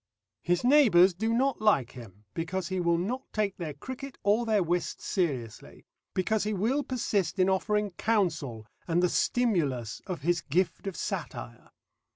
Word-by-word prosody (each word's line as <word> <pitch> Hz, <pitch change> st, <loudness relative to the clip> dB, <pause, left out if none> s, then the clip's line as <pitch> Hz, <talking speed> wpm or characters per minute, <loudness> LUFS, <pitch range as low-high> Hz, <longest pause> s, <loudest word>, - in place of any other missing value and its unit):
His 175 Hz, 0 st, 0 dB
neighbours 225 Hz, -10 st, +6 dB
do 220 Hz, +6 st, -1 dB
not 260 Hz, +1 st, +1 dB
like 170 Hz, -, +3 dB
him, 105 Hz, -5 st, -12 dB
because 180 Hz, +3 st, -3 dB
he 185 Hz, -1 st, -1 dB
will 170 Hz, -1 st, +2 dB
not 230 Hz, +10 st, -2 dB
take 210 Hz, -3 st, -1 dB
their 155 Hz, -5 st, -5 dB
cricket 260 Hz, -, -8 dB
or 215 Hz, +4 st, +2 dB
their 215 Hz, -3 st, +3 dB
whist 175 Hz, +1 st, -1 dB
seriously, 135 Hz, -, -3 dB, 0.3 s
because 210 Hz, +3 st, +1 dB
he 215 Hz, +1 st, -1 dB
will 235 Hz, +9 st, +1 dB
persist 210 Hz, -, -1 dB
in 185 Hz, 0 st, +3 dB
offering 210 Hz, +2 st, 0 dB
counsel 165 Hz, -, -1 dB, 0.2 s
and 175 Hz, +1 st, +2 dB
the 180 Hz, -, +4 dB
stimulus 155 Hz, -, 0 dB
of 180 Hz, -5 st, -4 dB
his 170 Hz, +1 st, +1 dB
gift 180 Hz, +7 st, -1 dB
of 195 Hz, -, -3 dB
satire. -, -, -5 dB
185 Hz, 160 wpm, -29 LUFS, 165-220 Hz, 0.3 s, neighbours